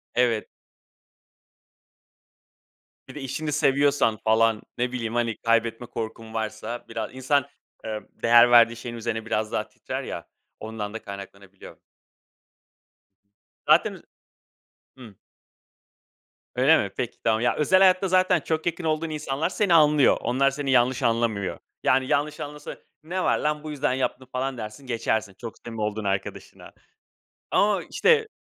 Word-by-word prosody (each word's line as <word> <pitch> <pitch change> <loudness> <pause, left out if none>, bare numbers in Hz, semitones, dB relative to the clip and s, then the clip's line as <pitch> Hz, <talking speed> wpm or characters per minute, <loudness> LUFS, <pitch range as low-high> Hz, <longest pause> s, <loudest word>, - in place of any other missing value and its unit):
Evet. 120 -3 +2 2.6
Bir - - -12
de 150 - -6
işini 150 +3 -4
seviyorsan, 140 -5 +2
falan 110 +1 +2 0.2
ne 125 +1 -1
bileyim, 115 -2 -4
hani, 115 -2 0
kaybetme 115 0 0
korkun 115 -1 -6
varsa 110 +2 -4
bira 110 -1 -4
İnsan, 130 +2 +1 0.4
ııı, 110 -1 -5
değer 120 +1 +5
verdiği 115 -1 +6
şeyin 120 0 -7
üzerine 115 -1 -3
biraz 110 -1 -1
daha - - -2
titrer - - -6
ya, - - -7 0.3
ondan 110 -1 -6
da 115 - -6
kaynaklanabiliyor. 100 -1 -11 1.9
Zaten - - +5
üz - - -13 0.9
Hımm. 115 -6 -13 1.4
Öyle 135 +6 +5
mi? 100 - -2
Peki 120 -2 -3
tamam. 110 -1 +2
Ya, 120 - +2
özel 185 +5 +3
hayatta 190 0 +5
zaten 185 -1 +3
çok 160 +2 -2
yakın 175 0 -2
olduğun 160 0 -1
insanlar 150 0 -2
seni 195 -2 +1
anlıyor. 150 -3 +5
Onlar 135 +3 +2
seni 140 -1 -3
yanlış 125 0 +3
anlamıyor. 115 -4 0 0.2
Yani, 130 0 +3
yanlış 150 +1 0
anlasa; 150 -1 -7 0.3
"Ne 180 +4 -3
var - - +2
lan, 150 0 -1
bu 155 - -6
yüzden 145 -2 0
yaptım." 130 0 -2
falan 130 0 -2
dersin 110 +4 -8
geçersin, 110 -3 -1
çok 115 -2 -8
samimi 115 -2 -6
olduğun 105 0 -2
arkadaşına. 100 -1 -4 0.8
Ama 205 -1 +2
işte, 455 -2 +3
125 Hz, 135 wpm, -25 LUFS, 110-150 Hz, 2.6 s, verdiği